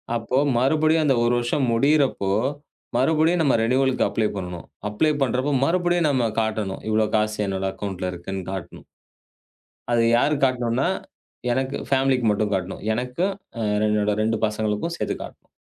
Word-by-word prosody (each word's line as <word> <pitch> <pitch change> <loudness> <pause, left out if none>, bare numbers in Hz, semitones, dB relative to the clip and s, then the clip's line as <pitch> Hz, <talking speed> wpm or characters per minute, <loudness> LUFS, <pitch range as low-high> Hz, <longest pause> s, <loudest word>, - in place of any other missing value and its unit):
அப்போ 120 +3 -1 0.2
மறுபடியும் 155 +5 +3
அந்த 135 -3 +3
1 120 +1 +2
வருஷம் 120 +3 0
முடியறப்போ 135 -6 +2 0.7
மறுபடியும் 160 +5 +3
நம்ம 145 -4 +3
ரெனிவலுக்கு 130 +3 +2
அப்ளை 110 -2 0
பண்ணணும். 90 -3 -6 0.2
அப்ளை 150 +9 +1
பண்றப்போ 130 +2 +1
மறுபடியும் 175 -1 +2
நாம 125 -5 +1
காட்டணும். 110 -3 -2
இவ்வளோ 110 0 +2
காசு 110 0 +1
என்னோட 95 0 -2
அக்கவுண்டன்ட்ல 95 -3 -4
இருக்குன்னு 95 +2 -6
காட்டணும். 95 -3 -7 1.1
அத 120 - +3 0.2
யாருக்கு 140 +2 +2
காட்டணுனா, 125 +3 0 0.6
எனக்கு 130 +2 -1
ஃபேமிலிக்கு 135 -3 +2
மட்டும் 105 0 -1
காட்டணும். 95 0 -3
எனக்கும் 125 - -1 0.3
அ - - -1 0.3
என்னோட 105 0 +1
2 110 +1 +1
பசங்களுக்கும் 105 +9 -2
சேர்த்து - - -2
காட்டணும். - - -13
120 Hz, 140 wpm, -23 LUFS, 105-140 Hz, 1.1 s, மறுபடியும்